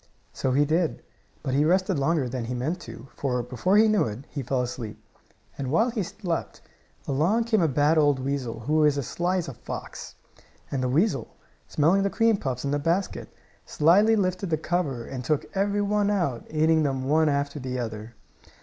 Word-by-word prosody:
So 130 - -1
he 145 +3 +3
did, 160 +2 0 0.4
but 135 -3 -2
he 140 +2 +3
rested 185 0 +2
longer 145 -1 +1
than 125 -1 -4
he 125 +2 -4
meant 155 +9 -2
to, 135 -6 -11
for, 125 -3 -1
before 135 - +1
he 220 +1 +6
knew 215 -1 +3
it, 115 +4 -6
he 140 - -4
fell 125 0 -1
asleep. 120 -3 -6 0.6
And 135 -2 -3
while 220 - +2
he 225 -3 -2
slept, 175 -2 -4 0.5
along 165 +12 +2
came 225 -3 +2
a 165 - +3
bad 150 +3 +3
old 145 -2 +3
weasel, 130 -4 -3
who 155 +6 +2
is 150 -1 +3
as 140 - -2
sly 175 +7 -1
as 175 - -2
a 135 - -6
fox. - - -8 0.6
And 135 - -1
the 125 - 0
weasel, 170 - 0 0.3
smelling 170 +6 +3
the 200 - +1
cream 225 +1 +2
puffs 130 -6 -3
in 140 - -1
the 145 - +1
basket, 170 +6 -1 0.3
slyly 200 +9 +4
lifted 185 -2 -1
the 155 - +1
cover 150 -7 -2
and 130 -2 -6
took 150 +2 0
every 205 +1 +1
one 205 0 +1
out, 170 - -1
eating 160 +1 +3
them 135 -3 -1
one 155 +2 +3
after 140 +1 -1
the 130 -1 -4
other. 110 -1 -5
150 Hz, 195 wpm, -26 LUFS, 130-185 Hz, 0.6 s, he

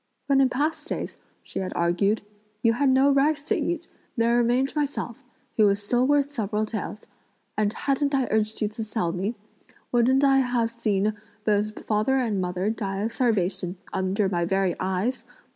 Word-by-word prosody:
"When 275 -1 +4
in 265 - +4
past 300 +4 -1
days," - - -4 0.3
she - - -5
had 185 - -3
argued, 195 +6 +1 0.4
"you 230 -1 +5
had 275 +3 +2
no 265 +2 +5
rice 285 +2 +2
to - - +1
eat, 340 -1 -2 0.3
there 230 +1 +3
remained 245 +4 +2
myself, 275 -4 -2 0.3
who 215 -2 +6
was 200 0 +1
still 245 +4 +2
worth 285 0 +2
several 215 -4 -1
taels; 215 -1 -5 0.5
and 210 -1 +1
hadn't 280 +4 0
I 265 -2 +2
urged 215 0 0
you - - +2
to 220 +1 -5
sell 215 -5 -1
me, 190 +6 -2 0.6
wouldn't 255 +3 +3
I 270 -1 +5
have 245 -3 +1
seen 215 -3 0 0.3
both 210 0 0
father 215 +5 +2
and 225 -7 +1
mother 180 +3 -1
die 195 -3 -3
of 225 +2 -2
starvation 190 -6 0 0.2
under 190 +2 +1
my 175 -2 0
very 190 0 +1
eyes? 190 +7 -1
225 Hz, 175 wpm, -25 LUFS, 200-265 Hz, 0.6 s, who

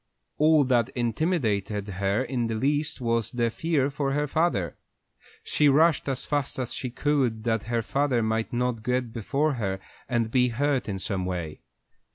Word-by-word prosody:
All 155 0 +5
that 125 -2 +2
intimidated 115 - 0
her 100 +4 0
in 125 -3 -1
the 115 - -2
least 145 +4 0
was 115 -2 0
the 120 -2 0
fear 145 -1 0
for 140 -1 -1
her 145 +1 +1
father. 145 - 0 0.7
She 150 -1 +3
rushed 155 +1 +4
as 130 -2 -2
fast 145 -2 -1
as 125 -2 -3
she 125 - -4
could 130 -4 0
that 115 -2 0
her 115 0 -1
father 135 -1 +1
might 110 0 -1
not 125 -2 -1
get 125 0 -1
before 140 +7 0
her 95 -2 -1 0.3
and 115 -3 0
be 125 0 +4
hurt 130 0 0
in 95 - -2
some 95 -1 -2
way. 85 -4 -4
125 Hz, 170 wpm, -26 LUFS, 110-140 Hz, 0.7 s, All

